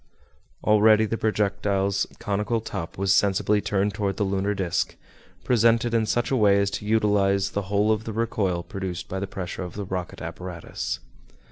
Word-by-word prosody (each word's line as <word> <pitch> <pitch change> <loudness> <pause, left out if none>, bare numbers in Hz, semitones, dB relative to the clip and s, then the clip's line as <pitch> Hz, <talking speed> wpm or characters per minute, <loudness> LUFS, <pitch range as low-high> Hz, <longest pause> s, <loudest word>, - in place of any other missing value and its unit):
Already 110 +1 +5
the 110 - -2
projectile's 100 -2 0
conical 105 +1 -1
top 85 -6 -6
was 95 0 +2
sensibly 100 +1 +2
turned 100 0 0
toward 100 -1 -2
the - - +1
lunar 100 +1 0
disc, 95 -3 -1 0.5
presented 115 0 +3
in 110 -2 +2
such 120 +4 0
a - - +3
way 100 -4 +4
as 100 0 +1
to 105 - -5
utilize 100 -3 +2
the 100 - -1
whole 105 +1 +2
of 110 0 0
the 110 - -4
recoil 100 -6 -1
produced 95 -2 -5
by 95 - -4
the 100 - -3
pressure 95 -1 -5
of 90 -1 -6
the 100 -1 -4
rocket 90 -1 -5
apparatus. 90 -3 -5
100 Hz, 170 wpm, -25 LUFS, 95-110 Hz, 0.5 s, Already